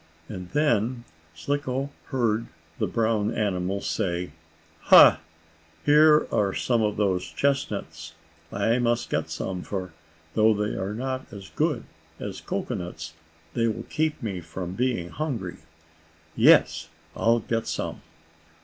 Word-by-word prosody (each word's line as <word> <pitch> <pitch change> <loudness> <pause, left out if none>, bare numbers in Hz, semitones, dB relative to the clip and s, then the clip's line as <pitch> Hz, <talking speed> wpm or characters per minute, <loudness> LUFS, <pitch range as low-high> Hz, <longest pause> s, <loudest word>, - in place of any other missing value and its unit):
And 90 -3 -7
then 120 -5 +1 0.3
Slicko 140 - -2
heard 115 -4 0 0.3
the - - +1
brown 110 -2 +1
animal 100 -3 -1
say: 90 -3 -2 0.5
"Ha! - - +9 0.7
Here 150 +1 +6
are 100 -2 +1
some 120 -2 +1
of 105 -1 0
those 95 -3 0
chestnuts! 90 - -2 0.4
I 115 +5 +1
must 120 -1 0
get 80 +1 -1
some, 90 +3 -4
for, 95 -3 -5 0.4
though 110 0 +4
they 105 +1 -1
are 100 +2 -3
not 130 +2 -4
as 100 -3 -10
good 150 -5 0 0.4
as - - -6
cocoanuts, 80 -2 -4 0.4
they 115 0 +1
will 110 - -3
keep 155 -3 -1
me 95 -5 -3
from 85 +2 -6
being 115 -6 -1
hungry. 115 - -4 0.8
Yes, - - +5 0.3
I'll 115 +1 +3
get 115 +1 -2
some!" - - -3
110 Hz, 125 wpm, -26 LUFS, 90-125 Hz, 0.8 s, Ha